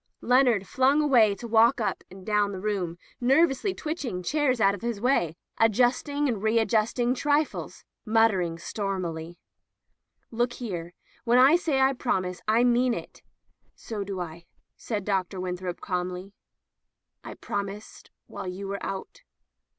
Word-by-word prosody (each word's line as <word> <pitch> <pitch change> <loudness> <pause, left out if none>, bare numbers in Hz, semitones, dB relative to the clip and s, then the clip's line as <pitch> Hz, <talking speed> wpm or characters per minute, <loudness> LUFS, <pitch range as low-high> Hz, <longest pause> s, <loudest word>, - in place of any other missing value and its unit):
Leonard 245 -5 +3
flung 265 +3 +3
away 240 -9 +4
to 235 - -8
walk 230 +1 +4
up 215 - -2
and 190 0 -13
down 210 -1 +1
the 190 - -6
room, 185 -4 -2 0.2
nervously 270 +7 +3
twitching 285 - -4
chairs 285 - +1
out 195 -2 +4
of 200 - -7
his 235 -3 -3
way, 200 - +1 0.2
adjusting 250 +6 +2
and 225 -6 -2
readjusting 225 +2 +1
trifles 295 +2 -1
— - - -61
muttering 215 -7 +2
stormily: 175 -3 -4 0.5
" - - -49
Look 240 +1 0
here. 175 -9 -6 0.3
When 240 0 +3
I 265 +5 +7
say 320 -6 0
I 265 +1 +4
promise, 185 -8 -2
I 225 +3 +4
mean 245 0 +3
it." - - -9 0.5
"So 215 -3 -5
do 195 -1 -5
I," 170 -1 -7 0.3
said 210 -4 -4
Dr. 190 -2 -1
Winthrop, 180 0 -4
calmly. 180 +1 -4 0.9
"I - - -8
promised 205 +1 -6 0.2
while - - -7
you 190 +2 -5
were 200 +1 -5
out. 195 - -6
220 Hz, 145 wpm, -26 LUFS, 190-250 Hz, 0.9 s, I